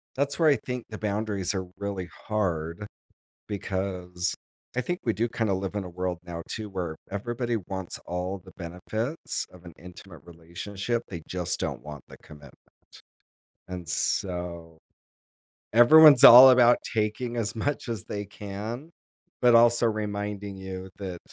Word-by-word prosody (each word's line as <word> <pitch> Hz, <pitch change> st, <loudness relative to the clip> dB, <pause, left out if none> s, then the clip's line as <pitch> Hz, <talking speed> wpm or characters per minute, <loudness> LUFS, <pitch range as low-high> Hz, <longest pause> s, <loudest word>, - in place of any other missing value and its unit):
that's 140 Hz, +1 st, -1 dB
where, 160 Hz, -2 st, +4 dB
I 140 Hz, -, +4 dB
think, 125 Hz, -2 st, -4 dB
the 110 Hz, -, -7 dB
boundaries 105 Hz, -2 st, -2 dB
are 95 Hz, -1 st, -3 dB
really 100 Hz, -3 st, -4 dB, 0.2 s
hard, 90 Hz, -3 st, -2 dB, 0.6 s
because, 95 Hz, -3 st, -3 dB, 0.4 s
I -, -, +2 dB
think 175 Hz, +9 st, -3 dB
we 115 Hz, -, +2 dB
do, 115 Hz, +2 st, -1 dB
kind 110 Hz, -3 st, -1 dB
of 95 Hz, -, +2 dB
live 95 Hz, +1 st, -4 dB
in 100 Hz, -, -2 dB
a 90 Hz, -, -7 dB
world 90 Hz, 0 st, -3 dB
now 85 Hz, -1 st, -6 dB
too, 110 Hz, -2 st, -5 dB
where 90 Hz, -5 st, -4 dB, 0.2 s
everybody 120 Hz, +3 st, -2 dB
wants 95 Hz, -2 st, -6 dB
all 90 Hz, +2 st, -3 dB
the -, -, -14 dB
benefits 110 Hz, -, -4 dB
of 90 Hz, -1 st, -16 dB
an 85 Hz, -, -10 dB
intimate 90 Hz, -2 st, -12 dB
relationship, 90 Hz, +7 st, -4 dB
they 85 Hz, -4 st, -7 dB
just 90 Hz, -2 st, -2 dB
don't -, -, -3 dB
want 75 Hz, -1 st, -9 dB
the -, -, -12 dB
commitment. 75 Hz, -3 st, -14 dB, 1.1 s
And 90 Hz, -3 st, -7 dB
so, 85 Hz, -3 st, -2 dB, 1.0 s
everyone's 140 Hz, +4 st, +8 dB
all 130 Hz, +2 st, +12 dB
about 120 Hz, -1 st, +6 dB, 0.2 s
taking 115 Hz, +3 st, -1 dB
as 115 Hz, 0 st, -2 dB
much 140 Hz, +2 st, -2 dB
as 115 Hz, -5 st, -3 dB
they 105 Hz, 0 st, -5 dB
can, 105 Hz, -, -7 dB, 0.5 s
but 120 Hz, -1 st, +6 dB
also 120 Hz, 0 st, +5 dB
reminding 105 Hz, -2 st, -3 dB
you 95 Hz, 0 st, -7 dB
that 95 Hz, -3 st, -5 dB
100 Hz, 150 wpm, -27 LUFS, 90-115 Hz, 1.1 s, all